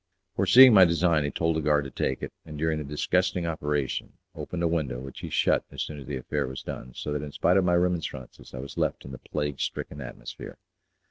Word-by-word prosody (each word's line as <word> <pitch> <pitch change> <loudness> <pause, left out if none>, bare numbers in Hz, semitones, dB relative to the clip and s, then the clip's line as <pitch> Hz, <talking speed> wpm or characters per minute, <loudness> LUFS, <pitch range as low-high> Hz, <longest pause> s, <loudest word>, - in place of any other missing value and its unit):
Foreseeing 120 +7 +8
my 95 -3 +9
design, 85 -2 +3
he 70 - -1
told 80 +1 0
a - - 0
guard 75 -1 +2
to 70 - -7
take - - -2
it, - - -5
and 75 -1 -9
during 80 0 0
the - - -4
disgusting 90 +5 0
operation 75 -4 -2 0.2
opened 85 -1 -5
a - - +3
window, 75 -7 -1
which 70 +1 -9
he - - -6
shut - - +2
as - - -4
soon 75 -2 -7
as 65 - -11
the 70 - -3
affair 65 - -2
was 65 +1 -7
done, 65 - -7
so 75 - -4
that 75 - -2
in 75 -1 -6
spite 90 - +2
of 95 - +4
my 90 -1 +3
remonstrances 85 -9 -2
I - - -6
was 70 +1 -7
left - - -1
in 65 - -8
the 65 - -8
plague 75 -3 -3
stricken 75 - -4
atmosphere. 65 - -9
75 Hz, 230 wpm, -27 LUFS, 70-85 Hz, 0.2 s, my